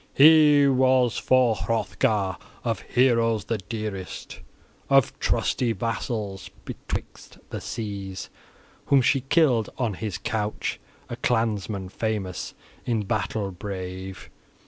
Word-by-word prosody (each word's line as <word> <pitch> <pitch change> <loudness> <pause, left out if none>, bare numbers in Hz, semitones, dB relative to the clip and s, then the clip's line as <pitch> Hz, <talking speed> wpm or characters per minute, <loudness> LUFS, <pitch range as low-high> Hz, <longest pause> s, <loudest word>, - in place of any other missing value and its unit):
He 150 -1 +7
was 130 -2 +3
for 125 -3 +3
Hrothgar 105 -3 0 0.3
of 115 -2 -1
heroes 115 -4 +2
the 115 -1 -2
dearest, 105 -2 -6 0.5
of 135 -3 +3
trusty 120 -3 +1
vassals 105 -2 -3 0.2
betwixt - - -7
the - - -4
seas, 100 -4 -5 0.6
whom 140 -2 +5
she 135 +2 +3
killed 135 -5 +3
on 120 -5 0
his 100 -1 -4
couch, 105 -1 -2 0.3
a 120 - -6
clansman 110 -6 -1
famous, 100 -4 -3 0.3
in 115 -3 0
battle 100 -1 -2
brave. 95 0 -7
110 Hz, 105 wpm, -25 LUFS, 100-125 Hz, 0.6 s, He